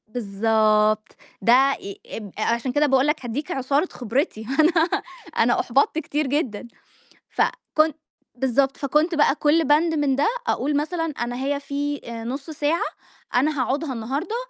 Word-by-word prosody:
بالضبط، 215 -1 +1 0.3
ده 255 +6 +5
ي 200 -6 -8
أب 210 -3 -8
أ - - -2
عشان 235 +3 0
كده 290 +4 +3
باقول 270 0 +3
لك 300 -3 -1
هادّيك 260 +6 -4
عُصارة 275 +6 +1
خبرتي، 245 - -2
أنا 330 +2 +3 0.4
أنا 240 +1 +3
أُحبطت 275 +5 +2
كتير 300 -1 -2
جدًا، 260 -5 -2 0.6
فكنت 310 - 0 0.4
بالضبط، 265 +2 +1
فكنت 300 +5 +1
بقى 295 -2 +3
كلّ 310 +2 +3
بند 310 +3 +3
من 290 -3 +1
ده 280 - +2 0.2
أقول 290 +1 0
مثلًا 325 +1 -2
أنا 240 0 -2
هي 285 0 0
في 285 +1 -3
آآ 230 -1 -6
نُص 275 +6 -5
ساعة 310 +2 0 0.5
أنا 280 +2 +2
هاقعُدها 275 +3 -1
النهارده 270 - -3
275 Hz, 150 wpm, -23 LUFS, 240-300 Hz, 0.6 s, ده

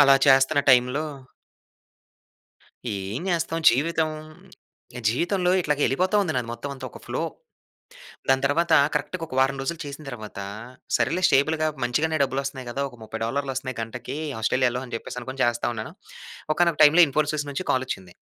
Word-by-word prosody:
అలా 140 -1 +7
చేస్తున్న 135 +2 +5
టైమ్‌లో 125 +4 +4 1.8
ఏం 100 +5 -4
చేస్తాం 165 -1 0
జీవితం. 155 +5 +1 1.0
జీవితంలో 180 - +1
ఇట్లాగా 150 -2 -1
వెళ్ళిపోతా 185 +9 +1
ఉంది 175 -5 -1
నాది 120 -2 -1
మొత్తం 120 +5 -6
అంతా 130 -1 -8
ఒక - - -11
ఫ్లో. - - -3 1.1
దాని 135 0 +3
తర్వాత 165 +5 +2 0.2
కరెక్ట్‌గా 180 -3 -2
ఒక 130 - -7
వారం 135 +1 +2
రోజులు 165 +4 -3
చేసిన 140 +2 -8
తర్వాతా, 105 -5 -7 0.5
సరేలే 180 +2 0
స్టేబుల్‌గా 155 +3 +2 0.2
మంచిగానే 155 +6 +1
డబ్బులు 135 0 -1
వస్తున్నాయి 130 -2 -6
కదా! 140 +3 -2
ఒక 120 - -16
30 110 +1 -6
డాలర్‌లు 135 +3 -2
వస్తున్నాయి 130 -2 -4
గంటకి 125 +3 -6 0.3
ఆస్ట్రేలియాలో 125 +2 +1
అని 120 - -6
చెప్పేసి 125 - -7
అనుకొని 130 +2 -3
చేస్తా 120 0 +1
ఉన్నాను. 110 -1 -6 0.6
ఒకానొక 170 -1 +1
టైమ్‌లో 160 +4 +8
ఇన్‌ఫోసిస్ 150 +1 0
నుంచి 160 +7 -4
కాల్ 130 - +1
వచ్చింది. 95 -5 -6
135 Hz, 150 wpm, -24 LUFS, 125-155 Hz, 1.8 s, టైమ్‌లో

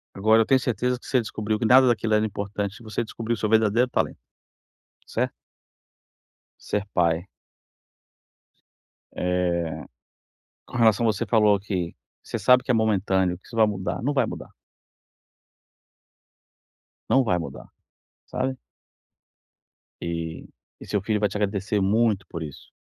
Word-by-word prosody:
agora, 110 +3 +4
eu - - -8
tenho 130 +2 +4
certeza 125 +1 -1
que - - -14
você 130 - +2
descobriu 110 -2 -2
que 115 - -2
nada 130 +3 +7
daquilo 115 -2 +1
era 105 0 +3
importante, 100 0 -4
e - - -15
você 110 +2 -3
descobriu 115 +1 -3
seu 110 -1 -2
verdadeiro 110 +3 +3
talento, - - -1 0.9
certo? - - -1 1.3
Ser 105 -1 -2
pai. 85 +1 +1 1.9
Eh, 90 -2 -1 0.8
com - - -8
relação 115 0 +4
a 110 - +4
você 95 - -3
falou 105 -3 +4
que 90 -4 -3 0.3
você - - -4
sabe 125 0 +5
que - - -6
é - - +5
momentâneo, 95 -5 +1
que - - -24
isso 115 - -10
vai 110 - +5
mudar, 100 -1 -3
não 145 +4 0
vai 135 -4 +2
mudar. - - -7 2.6
Não 135 - +5
vai 90 -7 +1
mudar, 80 - -8 0.6
sabe? 130 0 -2 1.5
E, 85 -1 -4 0.4
e - - -8
seu 105 - 0
filho 105 +2 0
vai 105 -1 +1
te 105 - -4
agradecer 100 0 -1
muito 105 0 +2
por 85 - -6
isso. 75 -3 -10
105 Hz, 140 wpm, -25 LUFS, 95-115 Hz, 2.6 s, nada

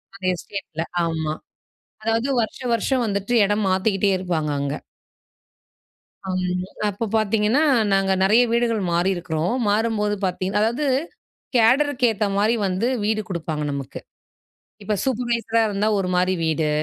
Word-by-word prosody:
அந்த 195 - -15
எஸ்டேட்டில 170 -3 -6 0.2
ஆமாம், 160 -2 -2 0.6
அதாவது 225 +4 0
வருஷம், 235 +2 -3
வருஷம் 250 +2 0
வந்துட்டு 200 +3 -2
இடம் 205 0 0
மாத்திக்கிட்டே 195 +1 +1
இருப்பாங்க 165 -5 -2
அங்க. 140 +1 -2 1.5
அம். 180 -1 -1 0.3
அப்போ 205 +3 -3
பார்த்தீங்கன்னா, 220 +6 +2 0.3
நாங்க 195 0 +2
நிறைய 220 +5 +5
வீடுகள் 235 -3 +1
மாறியிருக்கிறோம், 175 +1 0
மாறும்போது 210 -1 +1
பார்த்தீங் 185 +2 -1
அதாவது 235 +7 +1 0.7
கேடரு 265 +6 +4
கு - - +5
ஏத்த 210 0 -1
மாரி 220 +3 +3
வந்து 190 +6 0 0.2
வீடு 215 0 +1
கொடுப்பாங்க 160 -4 -3
நமக்கு. 140 -1 -5 0.8
இப்போ 210 +1 -1
சூப்பர்வைசர் 235 -3 0
அ - - +3
இருந்தா 205 +1 0
ஒரு 180 -1 -1
மாரி 185 +1 +2
வீடு. 160 -1 0
205 Hz, 130 wpm, -22 LUFS, 180-225 Hz, 1.5 s, நிறைய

